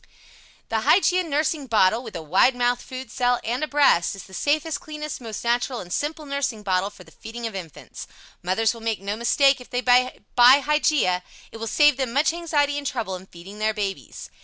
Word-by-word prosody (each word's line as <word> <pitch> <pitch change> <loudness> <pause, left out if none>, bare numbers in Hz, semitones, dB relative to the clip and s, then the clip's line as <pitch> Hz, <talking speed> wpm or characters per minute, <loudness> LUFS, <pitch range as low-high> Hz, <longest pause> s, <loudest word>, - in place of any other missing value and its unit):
] - - -28
The 225 - 0
Hygeia 365 - +3
nursing 300 -2 -1
bottle, 220 0 +3
with 225 -6 -10
a 165 - -5
wide 190 - +3
mouth 245 0 0
food 255 -3 -9
cell 245 -1 +1
and 245 +6 -2
a - - -1
breast, 280 - +3
is 195 - -9
the 190 - -16
safest, 300 - -1
cleanest, 305 -4 -7
most 225 -3 -7
natural, 240 +1 0
and 175 -1 -7
simple 305 +1 -3
nursing 280 -6 -3
bottle 190 0 0
for 205 - -15
the - - -19
feeding 235 +1 -8
of 225 - -4
infants. 175 -6 -9 0.3
Mothers 190 +6 +1
will 230 - -12
make 225 -1 -2
no 200 +2 -4
mistake 270 +4 +3
if 250 - -13
they 245 - -2
buy 250 +1 +3 0.2
the - - +2 0.2
Hygeia. 290 - +1 0.3
It - - -9
will 225 0 -5
save 295 +3 +4
them 260 -4 -2
much 295 +4 +2
anxiety 290 -4 0
and 285 - -5
trouble 220 -8 -3
in 185 +1 -11
feeding 190 +5 -12
their 215 0 0
babies. 200 -2 -5
245 Hz, 210 wpm, -23 LUFS, 210-290 Hz, 0.3 s, save